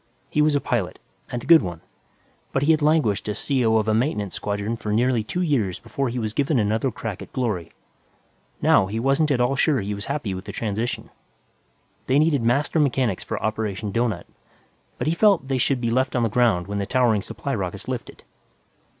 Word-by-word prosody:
He 150 - +2
was 150 -1 +3
a - - +3
pilot, 115 -9 -2 0.3
and 120 -1 -4
a - - -9
good 165 -1 +7
one, 85 -4 -5 0.7
but 135 - +1
he 155 - +4
had 155 -1 +3
languished 145 -10 +2
as 105 - -2
C.O. 120 -6 +2
of 110 -1 0
a 110 - +3
maintenance 110 - 0
squadron 105 +2 -2
for 110 -2 -5
nearly 120 +1 +2
two 180 +11 -2
years 115 - 0
before 120 +3 -3
he 120 - -4
was 110 -3 -2
given 145 +3 +1
another 110 +4 +1
crack 110 -4 -6
at - - -10
glory. 100 -10 -2 0.9
Now, 95 - +5
he 110 +3 -3
wasn't 135 +5 +2
at 135 -4 +1
all 125 +3 +2
sure 140 0 +2
he 105 0 -3
was 100 +1 -5
happy 115 -10 -3
with 95 +2 -6
the - - -6
transition. 110 +2 -3 1.0
They 130 - +3
needed 150 -3 +3
master 140 +7 +1
mechanics 130 -8 +1
for - - -4
Operation 110 -1 -2
Doughnut, 110 -5 -1 0.7
but - - -3
he 155 - +2
felt 195 -6 +3
they 135 -1 +1
should 130 +1 +1
be 115 -1 -1
left 130 +1 +1
on 120 - +2
the 115 - +1
ground 110 -6 +2
when 100 +1 -3
the 100 - -2
towering 120 -4 +2
supply - - -5
rockets - - -4
lifted. - - -6
120 Hz, 205 wpm, -23 LUFS, 105-135 Hz, 1.0 s, good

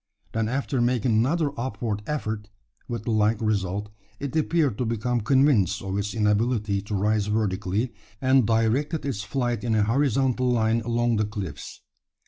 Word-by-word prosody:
Then 110 -1 -1
after 135 0 -1
making 120 -1 +1
another 140 +8 +2
upward 110 -3 -3
effort, 110 -8 -3 0.4
with 120 -3 -4
the 115 - -2
like 110 0 +2
result, 105 -2 -1 0.3
it 140 0 -4
appeared 155 -7 +1
to 125 - 0
become 115 +2 -1
convinced 115 - +3
of 95 -1 -3
its 100 +2 -2
inability 105 -1 +1
to 105 +1 -4
rise 105 +1 +1
vertically, 105 +2 -1 0.3
and 130 -3 +4
directed 120 +8 +1
its 125 -8 -2
flight 120 +2 -2
in 115 -2 +1
a 105 - +3
horizontal 130 +1 +1
line 115 -1 +2
along 120 0 +1
the 105 - +1
cliffs. 100 -9 -7
115 Hz, 155 wpm, -25 LUFS, 105-125 Hz, 0.4 s, and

